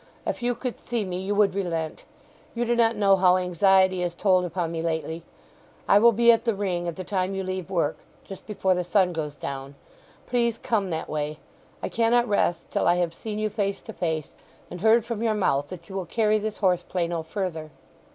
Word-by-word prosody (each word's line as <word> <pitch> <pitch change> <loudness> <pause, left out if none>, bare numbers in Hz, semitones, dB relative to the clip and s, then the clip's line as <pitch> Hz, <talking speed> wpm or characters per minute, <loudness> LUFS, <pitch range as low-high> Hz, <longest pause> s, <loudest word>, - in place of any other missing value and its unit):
If - - -3
you 245 0 0
could 250 0 -5
see 235 -4 -2
me 180 -1 -4
you 195 +2 -2
would 200 -2 +3
relent. 165 -5 -3 0.5
You 240 +1 0
do 240 0 +1
not 230 -1 +3
know 200 -2 +4
how 185 -1 +5
anxiety 185 +1 +3
has 175 -1 -2
told 185 -1 +3
upon 175 -1 -2
me 165 -1 -3
lately. 160 0 -2 0.7
I 200 - +6
will 235 +2 +7
be 235 +2 +5
at 230 - +2
the 230 -3 0
Ring 180 -3 -2
at 170 - -3
the 185 - -6
time 190 -1 -1
you 195 - -2
leave 185 -1 -4
work—just 175 +2 -4
before 195 -3 +1
the 180 0 -1
sun 180 0 +2
goes 150 -3 -4
down. 140 0 -6 0.5
Please 235 -2 +1
come 215 -5 -1
that 160 -2 -3
way. 150 0 -3 0.5
I - - -2
cannot 235 +1 +2
rest 175 -5 0
till - - +1
I 175 - +5
have 175 -2 0
seen 210 +4 -6
you 215 0 -1
face 200 -2 -1
to - - -9
face, 160 -3 -3 0.4
and 180 - -7
heard 225 +1 +4
from 230 -2 -4
your 225 -2 +1
mouth 145 -8 +1
that 170 -1 -10
you - - -10
will 190 -3 -4
carry 215 +3 +2
this 215 0 -4
horse 180 -3 +2
play 175 -1 -2
no 170 -1 -2
further." 160 -2 -4
190 Hz, 215 wpm, -25 LUFS, 170-215 Hz, 0.7 s, will